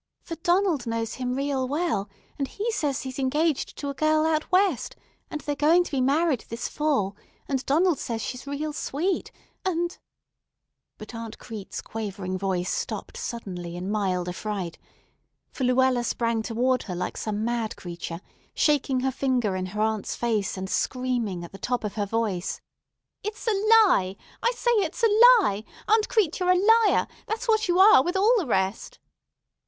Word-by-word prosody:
For 335 - -6
Donald 345 -6 +1
knows 230 0 -2
him 250 0 -1
real 275 -1 -1
well, 285 - -1 0.3
and 275 - 0
he 435 - -3
says 290 -10 -1
he's 260 0 -6
engaged 295 +3 0
to 285 - -4
a - - -6
girl 310 +2 +2
out 315 +1 0
West, 370 - +2 0.3
and 305 - -5
they're 290 - -2
going 320 +5 +4
to - - -9
be 270 -3 0
married 280 0 +2
this 230 +1 -3
fall; 275 -11 0 0.3
and 270 -2 -1
Donald 325 +2 +3
says 230 -3 -3
she's 250 +4 -5
real 295 +2 -3
sweet 330 +5 -2 0.3
and——" 345 -2 -1 1.0
But 215 - -10
Aunt 230 -1 -7
Crete's 220 -5 -7
quavering 200 -4 -4
voice 185 -2 -1
stopped - - -4
suddenly 190 - -5
in 185 +3 -4
mild 185 -4 0
affright, 185 -1 -4 0.7
for 260 - -2
Luella 255 -1 +3
sprang 230 -1 0
toward 245 +3 +1
her 180 - -2
like 180 - -3
some 215 0 -2
mad 235 -2 -1
creature, 170 -1 -7 0.3
shaking 275 -3 +2
her 265 +1 +1
finger 250 -6 0
in 185 0 -2
her 210 +3 -4
aunt's 220 -2 -1
face, 220 -5 -1
and 190 0 -4
screaming 240 -6 -1
at 170 - -9
the 195 - -11
top 245 -1 -1
of 210 - -3
her 205 -2 -2
voice: 205 -4 -1 0.6
"It's 425 +1 -5
a 455 - +2
lie! 410 - +4 0.3
I 475 - +3
say 480 - +1
it's 400 +4 -1
a 460 +2 +7
lie! 200 - -1 0.2
Aunt 435 0 +3
Crete, 390 -8 +1
you're 360 -1 +1
a 365 - +6 0.3
liar; - - +2 0.2
that's 450 +3 -3
what 435 -2 +3
you 350 0 +2
are 385 -7 +8
with 350 +2 -2
all 420 +5 +5
the 340 - -3
rest." 190 -1 -1
260 Hz, 175 wpm, -26 LUFS, 210-335 Hz, 1.0 s, are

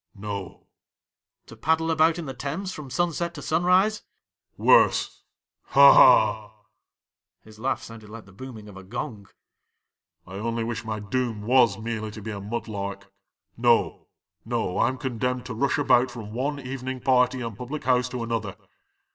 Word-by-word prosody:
'"No." 100 -2 -7 0.3
' - - -68
" - - -60
To - - -13
paddle 160 +1 +1
about 160 +1 +3
in 170 - -5
the 135 - -5
Thames 150 +9 -4
from 150 -3 -9
sun 175 +6 0
set 170 +1 -3
to 145 - -7
sun 160 +2 0
rise 190 +4 +3 0.2
?" - - -64
' - - -68
" - - -56
Worse. - - +3 0.4
Ha! 140 0 +8
ha! 110 0 +5 0.4
" - - -57
(his 110 0 -15
laugh 130 +4 -2
sounded 115 -2 -11
like 110 +1 -10
the 100 - -17
booming 110 +1 -10
of 100 - -12
a 95 - -10
gong). 105 0 -6 0.5
" - - -56
I 95 +1 -9
only 115 +1 -2
wish 115 0 -4
my 110 -1 -4
doom 110 +1 -3
was 120 -3 +4
merely 110 0 -4
to 105 0 -9
be 110 - -5
a 100 -1 -6
mud 115 +5 -5
lark. 100 -2 -6 0.4
No, 120 0 +1 0.4
no, 90 - -2
I - - +4
'm 130 +1 -2
condemned 125 0 -3
to 125 - -5
rush 135 +5 0
about 130 -3 +3
from 110 -4 -9
one 140 +4 -2
evening 130 0 -5
party 125 0 +2
and 115 -3 -5
public 125 +7 -6
house 125 -1 +2
to 125 -2 -4
another. 115 -4 -3
120 Hz, 190 wpm, -25 LUFS, 110-135 Hz, 0.5 s, Ha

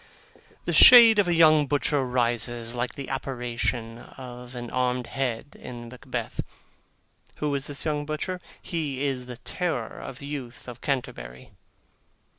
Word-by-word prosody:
The - - -1
shade 230 -3 +9
of 200 - +3
a 175 - +2
young 155 -3 +6
butcher 145 0 +1
rises, 120 -1 -1
like 120 0 -3
the 140 - -6
apparition 120 -3 -3
of 125 0 -11
an 120 -1 -6
armed 125 -1 0
head 130 +1 -3
in 120 -1 -8
Macbeth. 125 -2 -5 0.9
Who 150 -1 -2
is 140 0 -1
this 145 -1 -2
young 150 -2 0
butcher? 180 +4 -3 0.2
He 145 -5 -3
is 130 -3 -2
the 125 -1 -7
terror 160 -6 -3
of 130 - -8
the 140 - -10
youth 135 -5 -7
of 120 -2 -9
Canterbury. 65 - -4
130 Hz, 145 wpm, -26 LUFS, 120-145 Hz, 0.9 s, shade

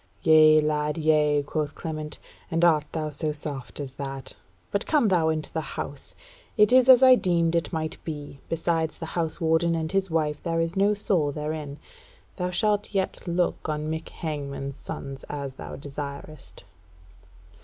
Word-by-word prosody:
"Yea 155 -1 +7
lad, 150 0 0
yea," 150 -2 +3
quoth 150 0 -3
Clement, 155 -2 -5 0.3
"and 165 +1 +2
art 155 -3 +4
thou 155 -2 -3
so 150 +1 -1
soft 145 -3 -6
as 135 -3 -5
that? 135 -1 -5 0.4
But 200 - -1
come 290 -9 +3
thou 170 -4 +3
into 155 -1 -3
the 160 -1 -4
House; - - -6 0.4
it 210 +2 +5
is 255 0 +6
as 260 0 +9
I 260 0 +9
deemed 170 -7 +2
it 170 -1 0
might 155 -2 -4
be; 145 -3 -7
besides 165 -1 -1
the 165 - -6
House 165 -2 -2
warden 165 +1 +2
and 160 -1 -2
his 195 -1 0
wife 155 -2 0
there 165 -1 -1
is 165 +2 -1
no 200 +2 +3
soul 180 -8 +1
therein. 150 -1 -4 0.6
Thou 180 -1 -1
shalt 205 +2 0
yet 190 -1 0
look 175 -2 -1
on 155 0 -2
Mick 160 0 -4
Hangman's 140 -3 -5
sons, 140 -1 -7
as 140 -2 -4
thou - - -8
desirest." 140 +1 -8
155 Hz, 165 wpm, -26 LUFS, 150-170 Hz, 0.6 s, as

